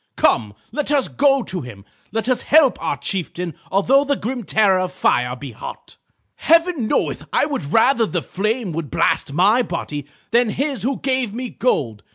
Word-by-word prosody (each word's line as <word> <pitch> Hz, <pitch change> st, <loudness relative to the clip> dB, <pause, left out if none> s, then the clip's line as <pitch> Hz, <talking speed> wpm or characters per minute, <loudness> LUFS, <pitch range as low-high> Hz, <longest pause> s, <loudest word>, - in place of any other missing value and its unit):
Come, 105 Hz, -3 st, +1 dB, 0.2 s
let 295 Hz, -1 st, -2 dB
us 280 Hz, -3 st, +4 dB
go 275 Hz, -2 st, +2 dB
to 185 Hz, -4 st, -4 dB
him. 105 Hz, -6 st, -11 dB, 0.3 s
Let 225 Hz, +2 st, -2 dB
us 255 Hz, -1 st, +1 dB
help 295 Hz, -4 st, +4 dB
our -, -, -1 dB
chieftain 180 Hz, -2 st, -4 dB, 0.2 s
although 255 Hz, +9 st, +4 dB
the 285 Hz, 0 st, 0 dB
grim 245 Hz, +1 st, -4 dB
terror 200 Hz, -2 st, +3 dB
of 185 Hz, -1 st, -2 dB
fire 125 Hz, -8 st, +1 dB
be 130 Hz, +1 st, -8 dB
hot. 110 Hz, -, -10 dB, 0.4 s
"Heaven 330 Hz, -7 st, +2 dB
knoweth -, -, -1 dB
I -, -, +2 dB
would 285 Hz, -, -3 dB
rather 230 Hz, 0 st, +4 dB
the 175 Hz, -4 st, -2 dB
flame 215 Hz, 0 st, -2 dB
would 155 Hz, -3 st, -4 dB
blast -, -, +1 dB
my 200 Hz, -, +3 dB
body 150 Hz, -, -5 dB, 0.2 s
than 240 Hz, 0 st, +3 dB
his 275 Hz, +3 st, -2 dB
who 265 Hz, +2 st, -1 dB
gave 255 Hz, -5 st, -1 dB
me 250 Hz, 0 st, -5 dB
gold. 125 Hz, -, -1 dB
220 Hz, 180 wpm, -20 LUFS, 170-265 Hz, 0.4 s, us